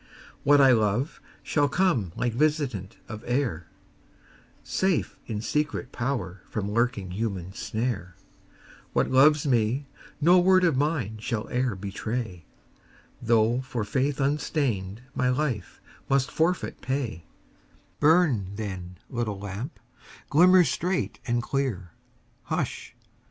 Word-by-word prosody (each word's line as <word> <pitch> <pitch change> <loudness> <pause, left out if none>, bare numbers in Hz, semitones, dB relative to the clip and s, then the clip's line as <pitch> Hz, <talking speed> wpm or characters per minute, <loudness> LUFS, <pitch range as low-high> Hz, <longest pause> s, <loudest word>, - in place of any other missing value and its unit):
What 145 +1 +6
I 135 -2 +7
love 115 +4 +1 0.2
shall 145 -2 +1
come 140 - +1
like 120 -2 -1
visitant 135 - 0
of 110 -1 -8
air, 120 - -1 1.0
Safe 190 -2 0
in 105 -3 -3
secret 145 +2 -1
power 110 -8 -3
from 105 -1 -3
lurking 115 -4 0
human 95 -3 -3
snare; 110 -6 -3 0.8
What - - +1
loves 145 +3 +5
me, 125 +1 +1 0.3
no 175 +4 +6
word 185 +1 +5
of 165 -5 +3
mine 130 -7 -1
shall 110 -1 -3
e'er 125 -3 0
betray, 100 -1 -4 0.8
Though 115 +1 +3
for 125 -4 -3
faith 135 +7 0
unstained 135 - -1
my 125 - +1
life 125 -7 -2 0.3
must 135 0 +2
forfeit 170 +3 0
pay 125 - -3 0.7
Burn, 145 - +3
then, 95 -4 -6
little 115 -5 -3
lamp; 100 - -6 0.5
glimmer 180 +4 +7
straight 180 +2 -1
and 120 0 +1
clear 120 -11 -2 0.5
Hush! - - -3
125 Hz, 115 wpm, -26 LUFS, 105-145 Hz, 1.0 s, I